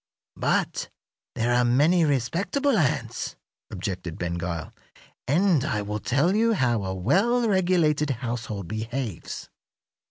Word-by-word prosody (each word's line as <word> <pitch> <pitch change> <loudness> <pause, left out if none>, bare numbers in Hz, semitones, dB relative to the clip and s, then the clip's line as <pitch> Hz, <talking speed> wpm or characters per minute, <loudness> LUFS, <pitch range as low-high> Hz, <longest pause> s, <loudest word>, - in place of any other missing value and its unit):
"But - - 0 0.5
there 120 +2 +1
are 125 0 +4
many 150 +9 +4
respectable 170 - +1
ants," 160 -10 -1 0.3
objected 90 -3 -5
Ben 85 -1 -2
Gile, 85 -2 -4 0.5
"and 165 0 +3
I 105 -9 -1
will 105 +1 -3
tell 145 - +2
you 225 +1 +3
how 120 - +1
a 95 0 -3
well 205 - +2
regulated 175 -7 +2
household 115 -6 -4
behaves. 110 -2 -5
130 Hz, 120 wpm, -25 LUFS, 105-175 Hz, 0.5 s, are